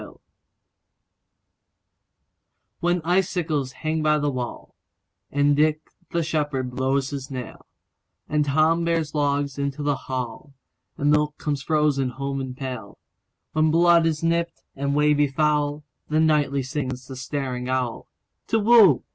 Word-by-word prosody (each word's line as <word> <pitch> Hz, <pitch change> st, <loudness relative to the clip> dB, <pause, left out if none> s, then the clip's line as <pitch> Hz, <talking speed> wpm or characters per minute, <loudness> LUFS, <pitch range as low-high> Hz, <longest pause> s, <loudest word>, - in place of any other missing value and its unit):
Winter -, -, -12 dB, 2.6 s
WHEN 175 Hz, 0 st, +1 dB
icicles 170 Hz, -6 st, 0 dB
hang 155 Hz, +3 st, -2 dB
by 150 Hz, 0 st, +3 dB
the 145 Hz, -1 st, 0 dB
wallAnd 125 Hz, -2 st, -5 dB, 0.8 s
Dick 155 Hz, +1 st, +3 dB, 0.3 s
the 170 Hz, -1 st, 0 dB
shepherd 145 Hz, -5 st, -1 dB
blows 135 Hz, +2 st, 0 dB
his 135 Hz, -2 st, -5 dB
nail, 125 Hz, -3 st, -7 dB, 0.6 s
And 150 Hz, 0 st, +1 dB
Tom 155 Hz, +4 st, +2 dB
bears 165 Hz, -3 st, 0 dB
logs 145 Hz, -2 st, 0 dB
into 140 Hz, +1 st, -2 dB
the 145 Hz, -1 st, +1 dB
hall, 130 Hz, +2 st, -5 dB, 0.4 s
And 145 Hz, +1 st, +2 dB
milk 150 Hz, 0 st, +1 dB
comes 145 Hz, -2 st, -2 dB
frozen 150 Hz, -4 st, +1 dB
home 135 Hz, +2 st, -4 dB
in 130 Hz, -1 st, -5 dB
pail; 125 Hz, -6 st, -6 dB, 0.5 s
When 155 Hz, 0 st, +2 dB
blood 170 Hz, +1 st, +5 dB
is 155 Hz, -1 st, -2 dB
nipt, 170 Hz, 0 st, 0 dB
and 140 Hz, +1 st, -1 dB
ways 150 Hz, 0 st, +3 dB
be 145 Hz, 0 st, +3 dB
foul, 150 Hz, +1 st, 0 dB, 0.3 s
Then 155 Hz, +1 st, +3 dB
nightly 145 Hz, -3 st, +2 dB
sings 130 Hz, -2 st, -4 dB
the 130 Hz, -, -8 dB
staring 130 Hz, -1 st, -4 dB
owlTu 130 Hz, -3 st, -2 dB, 0.5 s
whoo! 220 Hz, -, +6 dB
145 Hz, 130 wpm, -24 LUFS, 135-155 Hz, 2.6 s, whoo